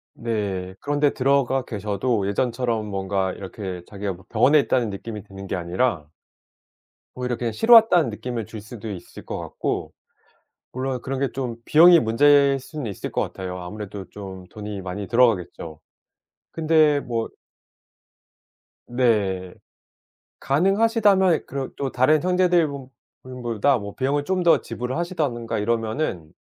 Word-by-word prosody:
네. 100 -5 -3
그런 145 0 -2
데 145 -1 +3
들어가 135 -1 +2
계셔도 105 0 -1
예전처럼 115 +1 -1
뭔가 95 -1 -1
이렇게 95 -2 -7
자기가 100 -1 -4
뭐 95 +1 -15
'병원에 135 +7 +4
있다.'는 125 -5 +1
느낌이 105 +1 -7
드는 100 -1 -10
게 - - -2
아니라 90 -1 -1 1.1
오히려 125 -1 -2
그냥 120 -2 -2
'쉬러 225 - +4
왔다.'는 180 - +6
느낌을 115 +1 -5
줄 110 -1 -9
수도 110 0 -9
있을 95 - -10
것 - - -5
같고 - - -4 0.8
물론 130 0 -3
그런 135 0 -3
게 140 - +1
좀 125 -4 -4
비용이 170 +5 +7
문제일 140 +4 +4
수는 145 -1 -7
있을 100 - -5
것 - - 0
같아요. 90 -1 -5
아무래도 100 +2 -7
좀 95 -2 -9
돈이 105 -1 -7
많이 95 +2 -5
들어가겠죠. 105 -9 +1 0.7
근데 155 -2 +3
뭐 115 -4 -3 1.6
네. 100 -7 0 0.9
가능하시다면 195 - +3
이 - - -6
그런 135 -1 -5
또 135 -2 -2
'다른 140 +5 +3
형제들분보다 140 - 0
뭐 100 -2 -7
비용을 140 +2 0
좀 185 +1 0
더 170 - +5
지불을 125 +3 -4
하신다든가 150 - -2
이러면은 110 - -2
120 Hz, 300 characters per minute, -23 LUFS, 100-140 Hz, 1.6 s, 비용이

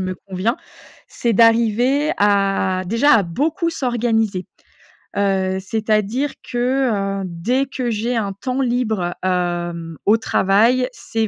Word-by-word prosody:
me 185 0 -3
convient. 195 +5 -1 0.5
C'est 235 -1 -1
d'arriver 235 +6 +3
à 195 -2 +2
déjà 230 +9 +3
à 220 - +4
beaucoup 300 - -1
s'organiser, 225 - -1 0.7
heu, 190 -1 0
c'est-à-dire 215 +6 -1
que, 240 -6 0
heu, - - -4
dès 210 +11 -1
que 255 -2 -3
j'ai 230 +3 -1
un 200 -3 -2
temps 255 +6 -3
libre, 220 -8 -1
hem, 175 -2 -2
au 215 +2 +6
travail, 225 +4 +2
c'est 225 -2 -3
220 Hz, 120 wpm, -19 LUFS, 190-245 Hz, 0.7 s, au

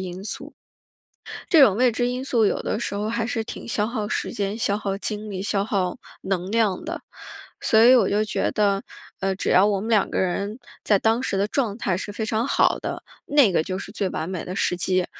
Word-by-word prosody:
因 185 0 -6
素。 - - -6 0.9
这 320 - +6
种 205 -7 +6
未 250 0 +4
知 245 +2 -1
因 250 +1 -3
素 235 -5 +2
有 - - 0
的 - - -2
时 220 - -3
候 210 +2 -2
还 230 0 -1
是 225 -2 -2
挺 - - -8
消 210 -2 0
耗 220 -2 -3
时 - - -2
间、 200 +1 -2
消 205 -2 +1
耗 195 -2 -3
精 210 0 -4
力、 190 -1 -4
消 200 -1 0
耗 190 -1 -1 0.2
能 190 -1 -2
量 215 -4 +1
的。 - - -5 0.6
所 220 0 +4
以 250 +3 +8
我 225 -6 +5
就 210 +1 +2
觉 215 - -1
得， 200 -1 +1 0.4
呃， 195 0 0
只 195 - -3
要 190 +3 +6
我 200 -2 +1
们 220 - -5
两 215 -3 +2
个 - - -2
人 200 +4 -2 0.3
在 205 -2 +4
当 225 +4 +1
时 195 -6 -1
的 200 - +2
状 230 -5 -1
态 185 -6 0
是 205 +2 -5
非 220 +1 -3
常 225 +2 0
好 - - +2
的， - - -5 0.2
那 285 -7 +4
个 170 - +2
就 185 +2 -4
是 195 - -7
最 200 -1 -2
完 160 - -4
美 185 -3 -4
的 180 - -6
时 180 - 0
机。 185 0 +1
205 Hz, 250 characters per minute, -23 LUFS, 195-225 Hz, 0.9 s, 以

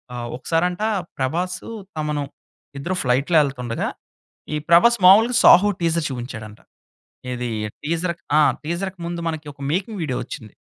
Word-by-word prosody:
ఆహ్, 120 -1 -4
ఒకసారంటా 175 - 0 0.3
'ప్రభాస్,' 175 +7 -1 0.4
'తమను' 150 -2 -1 0.5
ఇద్దరు 175 +7 -2
ఫ్లైట్‌లో 140 +6 +2
వెళ్తుండగా 125 -5 -2 0.7
ఈ - - 0
'ప్రభాస్' 235 +7 +5
మామూలుగా 225 +6 +7
'సాహో' 205 +3 +7
టీజర్ 165 -1 +1
చూపించాడంట. 115 -4 -7 0.7
ఏది 125 -1 -3 0.3
టీజర్ 170 +3 -1 0.2
ఆ! - - +6 0.2
టీజర్‌కి 180 +4 -4
ముందు, 170 0 -4
మనకి 160 -1 -6
ఒక 140 - -17
మేకింగ్ 195 +4 -2
వీడియో 130 -5 -2
వచ్చింది. 110 -7 -9
160 Hz, 130 wpm, -22 LUFS, 130-180 Hz, 0.7 s, మామూలుగా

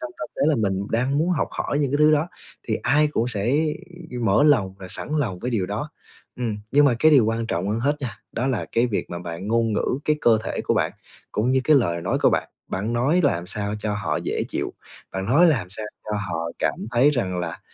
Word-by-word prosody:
trong 125 - -5
tâm 155 - -5
thế - - -1
là 155 - +3
mình 100 -4 0
đang 130 +5 +1
muốn 165 +4 +1
học 170 - 0
hỏi 145 - -2
những 140 -3 +1
cái 145 - +2
thứ 150 0 +6
đó 150 +3 +2 0.4
thì - - +2
ai 150 +2 +3
cũng 120 -5 0
sẽ 120 +4 0 0.7
mở 105 +7 +4
lòng 105 -11 +3
và 95 - -8
sẵn - - -6
lòng 110 -11 -1
với 125 - -3
điều 105 -6 0
đó. 105 +10 -4 0.5
Ừm, 115 -4 -2
nhưng 145 +1 +6
mà 135 -4 +4
cái 155 - +5
điều 135 -7 +6
quan 115 +1 -1
trọng 95 -3 -2
hơn 110 +2 -1
hết 145 +4 +1
nha, 115 -7 -5
đó 125 - -1
là 130 -5 0
cái 115 +2 +3
việc 110 -5 -3
mà 85 - -4
bạn 85 +2 -6
ngôn 115 0 +2
ngữ 125 +4 0
cái 150 - +2
cơ 115 -4 +4
thể - - -3
của - - +1
bạn - - +1 0.4
cũng 110 +4 +1
như 130 0 +3
cái 155 +2 +5
lời 85 -10 +1
nói - - -1
của - - +6
bạn, - - 0 0.2
bạn 105 +5 -2
nói 135 +9 +2
làm 90 -10 +1
sao 105 +2 -3
cho 105 0 -2
họ 105 - -1
dễ - - -1
chịu, - - -3 0.4
bạn 95 0 -3
nói 145 - +5
làm 130 - +2
sao 105 +2 -4 0.2
cho 110 - -7 0.2
họ 85 -1 -2
cảm - - -1
thấy 125 +4 +4
rằng 95 -10 -1
là, 90 - -4
115 Hz, 245 wpm, -23 LUFS, 100-140 Hz, 0.7 s, thứ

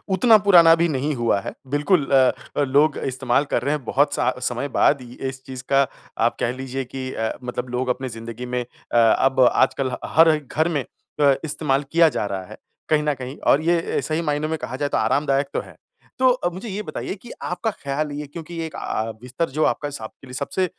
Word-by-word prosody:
उतना 225 +2 +6
पुराना 170 -4 +8
भी 170 +1 +2
नहीं 145 +1 -1
हुआ 115 -4 +1
है। - - -6 0.2
बिल्कुल 150 +2 +2
अ, 130 -2 +6 0.3
लोग 145 +2 +3
इस्तेमाल 130 +1 0
कर - - +2
रहे 145 +3 +1
हैं 150 - -6
बहुत 145 +5 +2
स - - +2 0.2
समय 125 +3 -2
बाद 140 -3 +4
ही 120 -1 -11 0.2
इस 130 0 -10
चीज़ 130 -1 -8
का 135 -1 +4 0.4
आप 120 - +1
कह 120 - 0
लीजिए 130 0 -4
कि 130 +1 -6
अ, 110 0 -1
मतलब 125 0 -4
लोग 125 +1 -2
अपनी 130 +1 -2
ज़िंदगी 115 +2 -7
में 125 0 -2
अ, 120 0 -6
अब 130 +3 +4
आजकल 130 -2 +1
ह 125 - -3 0.2
हर 160 -1 +6
घर 155 +3 -1
में 150 -5 -1 0.4
अ, 140 -1 +6
इस्तेमाल 145 -2 0
किया 165 -1 +5
जा 105 - -2
रहा 95 -2 -4
है। - - -9 0.3
कहीं 155 -1 +3
न 150 -1 +1
कहीं 130 +1 -7
और 140 - +5
ये 170 +1 +1
सही 155 +1 -1
मायनों 150 -1 -1
में 160 - -1
कहा 130 - -6
जाए 145 +2 -2
तो - - 0
आरामदायक 140 +1 +1
तो - - 0
है। - - -14 0.4
तो 255 -1 +4
मुझे 190 +6 -7
ये 205 +2 -3
बताइए 200 - -5
कि 235 +4 -13
आपका 180 +5 -2
ख्याल 145 -2 -3
ये 145 +1 -5
क्योंकि 165 +3 -7
एक 155 - -8
अ, 110 +1 -3
बिस्तर 130 +7 -3
जो 155 +4 0
आपका 145 - 0
स 140 -5 -8
आपके 110 +4 -10
लिए 125 - -11
सबसे 140 +8 -1
140 Hz, 220 wpm, -22 LUFS, 130-155 Hz, 0.4 s, पुराना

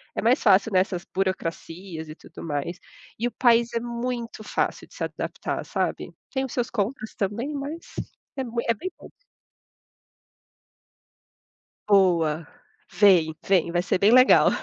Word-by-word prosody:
é - - -1
mais 245 +5 +3
fácil 200 0 +4
nessas 185 -1 +1
burocracias 180 -2 -3
e 155 - -9
tudo - - -13
mais. 150 +2 -3 0.4
E 235 - +1
o - - -4
país 235 0 +3
é 230 - 0
muito 235 -1 -4
fácil - - -2
de - - -19
se - - -4
adaptar, - - -4
sabe? - - -2 0.2
Tem 265 -1 -1
os 260 - -8
seus 245 -2 -1
contras 215 +1 -3
também, 230 +9 -2
mas 285 +2 -4 0.6
é 265 - -1
mui 235 0 -3
é 230 - +4
bem 300 - -5
pouco. - - -13 2.8
Boa, 170 -5 +3 0.5
vem 180 -6 +5
vem, 185 -3 +2
vai 175 0 +1
ser 185 - 0
bem 200 +4 +4
legal. 255 +1 +7
205 Hz, 150 wpm, -25 LUFS, 180-240 Hz, 2.8 s, legal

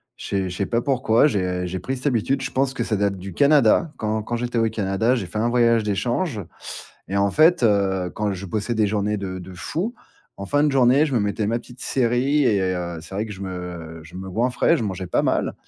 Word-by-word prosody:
Je - - -10
sais 95 -2 -1
je 90 - -6
sais 100 - -1
pas 115 - +1
pourquoi, 130 -2 +3
j'ai 90 -7 0
j'ai 90 +1 -4
pris 135 0 -3
cette 130 - -10
habitude. 130 +2 +1
Je - - -3
pense 135 0 0
que 120 - -1
ça 110 - -1
date 100 -1 0
du 95 0 -8
Canada, 140 - +4
quand 110 0 -1
quand 120 +3 -3
j'étais 120 0 -1
au 115 0 +2
Canada. 105 +4 +1
J'ai 105 -7 -2
fait 105 +5 -4
un 120 +2 +1
voyage 115 -2 +3
d'échange 115 - -1 0.7
et 100 - -2
en 100 0 +2
fait, 160 -3 +5
heu, 95 -4 +2
quand 105 -1 -1
je 95 +1 -6
bossais 110 +5 -2
des 110 -1 +3
journées 105 0 0
de 95 -2 -5
de 90 +1 -10
fou, 175 - -3 0.4
en 100 - -6
fin 145 +7 +2
de 150 - +3
journée, 135 +2 +4
je 140 -4 -2
me - - +4
mettais 105 +1 -1
ma 115 +1 +1
petite 125 +1 -14
série 130 +3 +1
et 105 -5 +3
heu, 90 -2 -2
c'est 90 +4 -9
vrai 110 +2 -1
que 105 - -7
je 95 - -10
me 90 -3 -6
je 85 - -14
me 95 0 -7
goinfrais, 125 - +2
je 115 - -2
mangeais 95 -2 -4
pas - - +1
mal, - - 0
105 Hz, 245 wpm, -23 LUFS, 95-125 Hz, 0.7 s, fait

